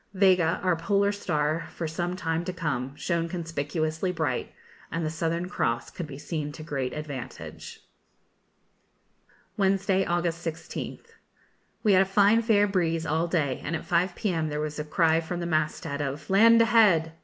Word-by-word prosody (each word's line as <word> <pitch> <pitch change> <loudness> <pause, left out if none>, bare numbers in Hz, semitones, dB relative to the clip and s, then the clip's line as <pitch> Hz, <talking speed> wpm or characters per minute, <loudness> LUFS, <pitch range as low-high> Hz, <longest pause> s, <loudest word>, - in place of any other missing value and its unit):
Vega, 185 -4 +4
our 180 -2 +3
polar 200 +4 +1
star 160 -5 -1
for 165 - -3
some 175 +3 -2
time 165 -2 -1
to 185 - -3
come, 140 -7 -3
shone 170 +1 -1
conspicuously 160 0 -2
bright, 160 -8 -2 0.4
and 165 -1 -2
the 155 - -1
Southern 165 +2 -2
Cross 120 -9 -1
could 175 - -6
be 140 -2 -8
seen 150 0 -4
to 155 - -9
great 135 -5 -3
advantage. 145 -5 -7 1.8
Wednesday, 195 -1 +2
August 170 -1 -1
16th. 170 - -6 0.7
We 210 -3 +4
had 185 - +6
a - - +3
fine 205 +3 +4
fair 215 -3 +4
breeze 165 -4 0
all 160 +2 0
day, 150 -7 0
and 160 - -2
at - - -5
5 175 +1 +1
p.m. 165 -7 -1
there 150 0 -3
was 150 0 -3
a - - -1
cry 160 +1 +2
from 175 +2 -4
the 170 - -3
mast 155 -2 0
head 145 -2 -3
of 145 +1 -4
'Land 230 +3 +7
ahead!' 210 -9 +4
165 Hz, 165 wpm, -27 LUFS, 155-185 Hz, 1.8 s, Land